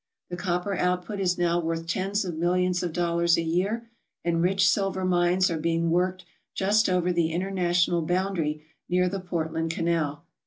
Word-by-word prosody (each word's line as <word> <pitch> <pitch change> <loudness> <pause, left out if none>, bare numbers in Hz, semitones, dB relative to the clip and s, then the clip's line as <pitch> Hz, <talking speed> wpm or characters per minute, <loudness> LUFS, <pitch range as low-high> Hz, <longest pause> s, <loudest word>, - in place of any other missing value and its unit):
The - - -2
copper 180 +2 -1
output 180 +2 -1
is 180 -2 +1
now 175 0 +2
worth 165 0 -2
tens 195 +4 -1
of 175 -3 -4
millions 180 +2 +1
of 175 - -2
dollars 170 0 +2
a 165 - 0
year, 195 +8 -1 0.4
and 165 -1 +1
rich 190 +2 +3
silver 195 -2 +1
mines 180 0 +2
are 165 - -2
being 165 +1 0
worked 180 +1 0 0.3
just 205 +3 +2
over 180 -1 +1
the 170 -2 +1
international 175 -1 +1
boundary 165 -3 -1 0.2
near 180 0 +2
the 195 +2 -3
Portland 165 -2 -2
Canal. 165 -3 -1
175 Hz, 165 wpm, -26 LUFS, 170-185 Hz, 0.4 s, rich